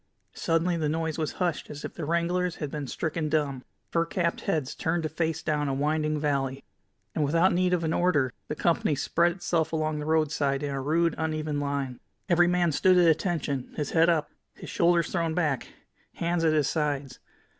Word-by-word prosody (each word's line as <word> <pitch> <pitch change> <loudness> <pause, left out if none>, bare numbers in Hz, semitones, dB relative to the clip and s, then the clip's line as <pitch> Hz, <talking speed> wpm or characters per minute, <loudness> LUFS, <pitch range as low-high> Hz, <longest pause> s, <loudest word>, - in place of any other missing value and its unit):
Suddenly 170 +1 +1
the 155 -2 0
noise 160 0 -2
was 155 - -1
hushed 175 -4 -2
as 145 0 -7
if - - -6
the 165 - -5
wranglers 170 +2 0
had 150 -3 -5
been 145 -2 -4
stricken 155 +2 -2
dumb. 145 -4 0 0.3
Fur 165 - +2
capped 170 0 -1
heads 145 -5 -1
turned 165 +1 -1
to 155 - -1
face 160 0 -2
down 150 -2 0
the 135 - 0
winding 150 +2 0
valley, 140 -2 -1 0.5
and 155 - 0
without 165 +6 +3
need 180 +1 +2
of 175 -2 +1
an 160 0 0
order, 145 -8 +2
the 150 - -3
company 165 -2 +1
spread 170 +5 +2
itself 170 -3 -1
along 155 -1 -1
the 150 - -5
roadside 150 -3 +1
in 145 - -2
a 135 - -2
rude, 165 +4 +2
uneven 155 -2 -1
line. 140 -3 -2 0.3
Every 175 0 +5
man 175 -1 +2
stood 185 +5 +4
at 175 -1 +6
attention, 155 -5 0
his 150 -2 -3
head 165 +1 +4
up, 160 -3 +1 0.2
his - - -9
shoulders 170 -1 +2
thrown 165 -3 0
back, 150 -7 0 0.5
hands 170 0 0
at 160 -1 +3
his 150 -3 +2
sides. 145 -3 -2
160 Hz, 195 wpm, -27 LUFS, 145-170 Hz, 0.5 s, at